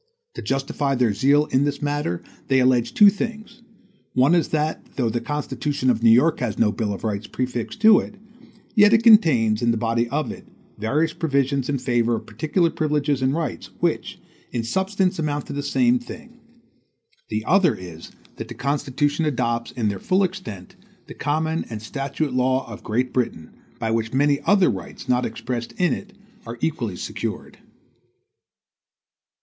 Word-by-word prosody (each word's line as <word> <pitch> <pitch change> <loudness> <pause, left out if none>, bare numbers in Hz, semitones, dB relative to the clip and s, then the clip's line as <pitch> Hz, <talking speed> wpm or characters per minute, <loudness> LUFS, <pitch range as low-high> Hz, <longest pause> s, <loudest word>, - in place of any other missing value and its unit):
To - - -7
justify 135 +1 -1
their 120 -4 +2
zeal 140 +7 +3
in 130 - +3
this 145 -1 -1
matter, 145 - -2 0.2
they 135 - +3
allege 125 -2 +2
two 205 -1 +8
things: 225 +2 -6 0.5
one 130 +6 +4
is 170 -2 +3
that, 155 0 -1
though 120 -4 0
the 120 +1 -2
constitution 145 -2 -1
of 115 -2 -1
New 115 - +5
York 145 +8 +4
has 115 -4 -2
no 105 -2 +3
bill 105 -1 -2
of 100 - -6
rights 105 -1 -3
prefixed 125 - -4
to 215 -1 +7
it, - - -7 0.6
yet 205 -1 +6
it 225 0 +4
contains, 130 - +5
in 120 - +2
the 115 - +2
body 115 +1 0
of 140 -2 -2
it, - - -11 0.3
various 150 +9 0
provisions 140 -3 0
in 140 - +1
favor 120 -2 +1
of - - -6
particular 165 +2 0
privileges 150 -3 0
and 130 +2 +1
rights, 165 -2 -4
which, - - -1 0.3
in 120 -2 -2
substance 190 - 0
amount 145 -2 -2
to - - -7
the 145 - -2
same 245 - +2
thing; 240 0 -11 0.9
the 110 0 -3
other 195 0 +4
is, 85 -3 -10 0.3
that - - -6
the - - -9
Constitution 145 +3 -1
adopts, 120 -4 -1
in 115 -4 -2
their 100 -2 -2
full 185 - +2
extent, 180 - -5 0.3
the - - -10
common 160 +2 -1
and 110 -2 -5
statute 135 +5 -3
law 130 +1 +1
of 115 - -9
Great 125 +4 -1
Britain, 115 -10 -2 0.3
by 110 - -2
which 115 +1 -1
many 140 +1 +3
other 195 -6 +5
rights, 95 -4 -8
not 125 0 +2
expressed 120 +1 -5
in 180 -1 +1
it, 200 +1 -7 0.3
are 115 +1 -6
equally 120 - -2
secured. - - -5
135 Hz, 170 wpm, -23 LUFS, 115-160 Hz, 0.9 s, two